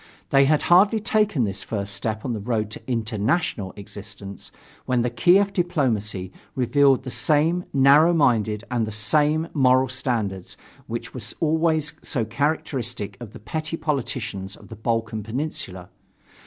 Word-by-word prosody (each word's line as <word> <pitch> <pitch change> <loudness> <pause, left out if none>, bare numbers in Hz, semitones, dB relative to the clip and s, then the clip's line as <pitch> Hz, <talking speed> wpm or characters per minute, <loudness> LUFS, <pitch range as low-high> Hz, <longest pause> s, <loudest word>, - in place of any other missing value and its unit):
They 135 0 +6
had 150 +1 +3
hardly 200 +5 +5
taken 210 - +1
this 100 -2 -3
first 100 -2 -4
step 110 +2 -3
on 125 - -1
the 110 - -3
road 110 -1 -1
to - - -8
"international" 115 - -1
existence, 100 -1 -10 0.4
when 125 -2 +2
the 120 - -1
Kiev 185 +12 +4
diplomacy 110 - -1 0.2
revealed 135 +1 +3
the 130 - -6
same 155 +8 +1
narrow 140 +5 +6
mindedness 115 -9 +2
and 115 -3 0
the - - -4
same 150 +9 +1
moral 130 -2 +4
standards 115 -8 -3 0.3
which - - -5
were - - -6 0.2
always 160 -1 +1
so 120 -6 -2
characteristic 120 -4 -2
of 120 -4 -9
the 120 - -11
petty 155 +9 -4
politicians 115 -10 -3
of - - -16
the 115 - -8
Balkan 115 0 -2
Peninsula. 110 - -5
125 Hz, 145 wpm, -24 LUFS, 110-155 Hz, 0.4 s, They